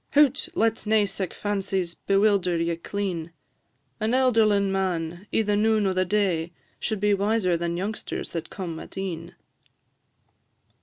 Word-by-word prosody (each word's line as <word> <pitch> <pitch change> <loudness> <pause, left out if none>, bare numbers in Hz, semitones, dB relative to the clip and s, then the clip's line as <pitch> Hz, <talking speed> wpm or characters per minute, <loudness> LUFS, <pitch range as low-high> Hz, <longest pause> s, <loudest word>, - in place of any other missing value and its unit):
Hoot! 290 -3 +4
let 225 -1 +1
nae 215 -1 +4
sic 195 -2 -3
fancies 195 -4 -2
bewilder 195 -3 +2
ye 170 0 0
clean 170 -2 -4 0.7
An 220 +2 0
elderlin' 215 -6 +3
man, 180 -1 -2
i' 225 - +2
the 210 -1 +1
noon 215 0 +3
o' 190 - +2
the 185 0 +1
day, 180 -4 0 0.3
Should 220 -3 -2
be 205 +1 +3
wiser 200 -2 +2
than 170 0 -2
youngsters 205 +4 -4
that 165 -1 -4
come 170 -5 -5
at - - -11
e'en." 175 -2 -5
195 Hz, 145 wpm, -25 LUFS, 175-210 Hz, 0.7 s, Hoot